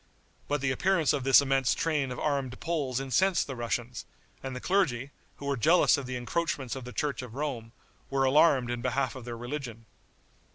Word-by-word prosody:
But 145 -1 -1
the 135 -1 +1
appearance 165 +1 +2
of 140 -3 -1
this 135 +1 +7
immense 135 -1 +2
train 150 -5 0
of 125 - -5
armed 140 -4 -2
Poles 145 -7 -1
incensed 155 +8 +2
the 135 - -6
Russians; 120 0 -3 0.4
and 135 -1 -5
the - - -4
clergy, 140 -8 0 0.2
who 140 - -10
were 140 0 0
jealous 160 +10 +4
of 140 -3 -5
the 130 0 -3
encroachments 135 0 -2
of 130 -2 -7
the 125 - -7
church 145 +1 -2
of 125 -2 -9
Rome, 130 -6 -4 0.4
were 135 0 +1
alarmed 135 -2 +4
in 120 -1 -3
behalf 130 0 0
of 130 -3 -9
their 120 -1 -6
religion. 120 -2 -6
135 Hz, 195 wpm, -29 LUFS, 125-145 Hz, 0.4 s, this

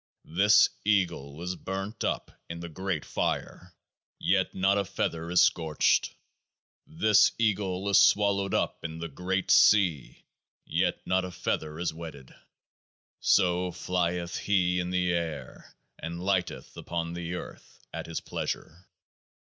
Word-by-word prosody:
This 100 +4 +6 0.2
Eagle 90 -8 0
is 90 +1 -3
burnt 95 +4 -5
up - - -2 0.2
in 85 0 -6
the 85 0 -7
Great 95 -1 -3
Fire; 90 -1 -3 0.4
yet - - +1
not 95 +2 +2
a - - +1
feather 85 -4 -3
is 90 0 +4
scorched. 80 -3 +2 0.7
This 105 +7 +4
Eagle 100 -4 0
is 100 - +5
swallowed 100 -1 +3
up - - -1
in 80 -1 -5
the 85 +1 -4
Great 95 +2 -2
Sea; 90 - +4 0.4
yet - - 0
not 95 0 +1
a 95 - -4
feather 75 -3 -3
is 85 -1 -2
wetted. 80 -5 -10 0.9
So 90 -1 +2
flieth 90 -1 -2
He 90 -3 +1
in 90 0 -2
the 90 -1 +1
air, 80 -6 -5 0.2
and 85 +2 -6
lighteth 95 -3 -1
upon 85 -1 -4
the 85 0 -4
earth - - -10
at - - -5
His 85 - -4
pleasure. 90 +4 -5
90 Hz, 135 wpm, -28 LUFS, 85-95 Hz, 0.9 s, This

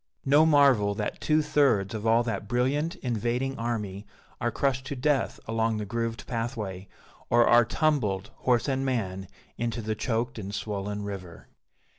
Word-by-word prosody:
No 145 +4 +5
marvel 135 -9 +4
that 105 -1 -4
two 155 0 +2
thirds 135 -10 +2
of 110 0 -3
all 115 +1 +4
that 115 -3 -3
brilliant 135 +8 0
invading 125 +2 -1
army 105 -4 -3 0.3
are 120 - 0
crushed 130 +2 0
to 140 - -4
death 140 +2 0
along 115 0 0
the 105 - -3
grooved 115 +2 -3
pathway, 110 -6 -4 0.4
or 120 0 +5
are 120 0 +6
tumbled, 115 - 0
horse 120 -2 +1
and 135 -1 0
man, 95 -8 -2 0.3
into 115 -1 -2
the 110 -1 -2
choked 115 +2 -2
and 100 0 -5
swollen 105 -1 -3
river. 95 -4 -8
115 Hz, 155 wpm, -27 LUFS, 105-130 Hz, 0.4 s, are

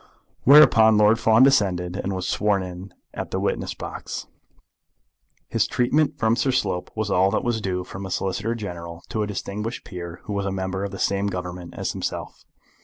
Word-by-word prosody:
Whereupon 115 -6 +7
Lord 105 +2 +5
Fawn 110 +2 +5
descended, 95 -9 +2
and 100 0 -3
was 95 -1 -3
sworn 100 -2 +1
in 90 +1 -8 0.2
at - - -5
the - - -2
witness - - -2
box. - - -6 1.2
His - - +1
treatment 140 +5 +1
from 110 0 +2
Sir 135 - 0
Simon 130 - +3 0.2
Slope - - -23
was 110 -2 -2
all 95 +1 +4
that 110 - -1
was 120 -2 -1
due 90 -2 -2
from 95 +2 -7
a - - -8
Solicitor 100 +5 -2
General 85 -6 -7
to 110 - -2
a 105 - -1
distinguished 105 +3 -4
peer 85 -2 -8
who 105 - -5
was 100 -1 -1
a - - -1
member 95 0 -3
of 100 - -2
the 95 - -8
same 100 +1 0
Government 90 -2 -5
as - - -2
himself. - - -5
100 Hz, 190 wpm, -23 LUFS, 90-110 Hz, 1.2 s, Whereupon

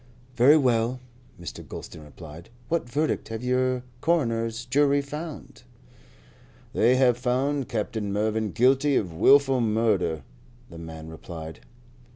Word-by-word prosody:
"Very 130 +6 +6
well," 125 -2 +1 0.4
Mr. 85 - -8
Gulston 80 - -9
replied. 75 - -12 0.2
"What 165 -7 -1
verdict 150 +5 -1
have 110 +1 -6
the 125 0 0 0.2
coroners 115 -8 0
jury 140 +3 +3
found?" 150 +3 -7 1.1
"They 120 +3 +4
have 125 -2 +3
found 130 +2 -1
Captain 105 -2 -3
Mervyn 110 +1 0
guilty 135 +5 +3
of 90 -8 -1
wilful 135 +8 +4
murder," 105 - +1 0.5
the 85 - -10
man 80 -1 -9
replied. 80 0 -9
120 Hz, 120 wpm, -25 LUFS, 100-135 Hz, 1.1 s, Very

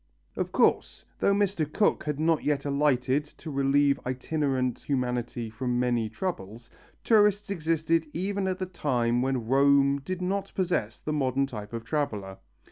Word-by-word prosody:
Of - - -2
course, - - +1
though 200 - +3
Mr. 195 -7 0
Cook 210 - +1
had 150 -1 -2
not 160 0 +2
yet 145 -1 0
alighted 140 -1 +1
to 160 - -7
relieve 140 +1 +2
itinerant 130 -1 -1
humanity 125 -3 -2
from 120 +2 -2
many 120 -3 +1
troubles, 115 - -5 0.3
tourists 210 -2 +3
existed 165 -2 0
even 195 +2 -2
at 185 -1 -1
the 185 - -3
time 125 -9 0
when 130 -3 -1
Rome 140 +2 +4
did 185 +5 -4
not 195 +2 -2
possess 175 - -1
the 155 - -3
modern 135 -2 +1
type 105 -6 -8
of 115 -1 -5
traveller. 105 -10 -3
140 Hz, 150 wpm, -27 LUFS, 125-165 Hz, 0.3 s, Rome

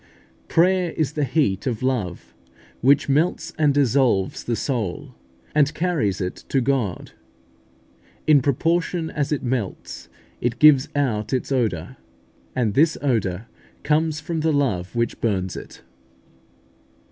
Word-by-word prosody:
Prayer 180 0 +2
is 155 -2 -1
the 150 - -1
heat 125 -8 0
of 120 -1 -2
love, 110 -10 -2 0.5
which 140 +4 +4
melts 150 +6 0
and 150 -2 +4
dissolves 130 -8 +1
the 120 - -1
soul, 125 +3 -3 0.4
and 150 -1 +2
carries 155 - 0
it 90 -1 -3
to 135 - +2
God. 125 -8 -1 1.1
In 150 -3 +5
proportion 165 +5 0
as 145 -1 -2
it 150 - -1
melts, 120 -6 -4 0.3
it 120 -1 -1
gives 150 -3 +6
out 120 -6 -1
its 130 +1 -2
odour, 110 -11 -1 0.6
and 115 -5 0
this 155 +6 +3
odour 110 -7 0 0.4
comes 155 +1 +1
from 160 +1 -3
the 160 +1 +1
love 120 -11 -1
which 115 0 -1
burns 95 -5 -1
it. - - -10
135 Hz, 130 wpm, -22 LUFS, 110-150 Hz, 1.1 s, gives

